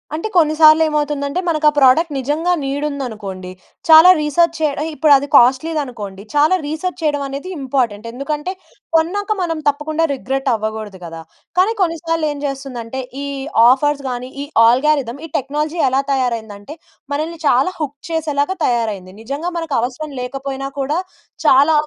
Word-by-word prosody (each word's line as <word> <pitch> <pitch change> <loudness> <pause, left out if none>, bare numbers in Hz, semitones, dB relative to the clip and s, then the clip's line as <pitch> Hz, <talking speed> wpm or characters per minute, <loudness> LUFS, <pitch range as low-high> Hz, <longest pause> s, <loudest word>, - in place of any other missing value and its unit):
అంటే 325 +7 -3
కొన్ని 310 -3 +4
సార్లు 310 0 +7
ఏమవుతుందంటే 295 0 -1
మనకా 310 -2 +3
ప్రొడక్ట్ 290 +4 +4
నిజంగా 295 +7 -1
నీడ్ 275 +2 -3
ఉందనుకోండి, 210 -10 -6 0.4
చాలా 320 +3 +9
రీసెర్చ్ 330 +3 +1
చేయ 305 -2 +2
ఆహ్, 320 - -2
ఇప్పుడది 285 -3 +4
కాస్ట్‌లీదనుకోండి 250 -7 +1
చాలా 305 +5 +4
రీసెర్చ్ 315 +5 -4
చేయడం 295 -2 0
అనేది 275 +7 -6
ఇంపార్టెంట్. 245 -5 -1
ఎందుకంటే 295 +6 -4 0.4
కొన్నాక 405 +6 0
మనం 330 -3 -1
తప్పకుండా 300 +3 0
రిగ్రెట్ 270 0 -3
అవ్వకూడదు 215 -3 -4
గదా! 165 -1 -8 0.4
కానీ 395 +5 +3
కొన్నిసార్లు 330 -2 0
ఏం 290 - -6
జెస్తుందంటే 265 -3 -5 0.2
ఈ - - -4 0.4
ఆఫర్స్ 285 +2 +2
గాని, 250 +1 -5
ఈ - - -6 0.2
ఆల్గారిథమ్, 265 0 +2
ఈ - - -7
టెక్నాలజీ 300 +5 -3
ఎలా 265 +1 +1
తయారైందంటే 230 -2 -3 0.4
మనల్ని 315 +3 -3
చాలా 275 +10 +3
హుక్ 290 -2 -4
చేసేలాగా 305 +1 -1
తయారయింది. 215 -6 -1
నిజంగా 285 +9 -4
మనకు 325 -4 -3
అవసరం 280 +5 -4
లేకపోయినా 270 +1 -5
కూడా 285 +4 -1 0.5
చాలా 285 +4 +5
285 Hz, 140 wpm, -18 LUFS, 255-315 Hz, 0.5 s, చాలా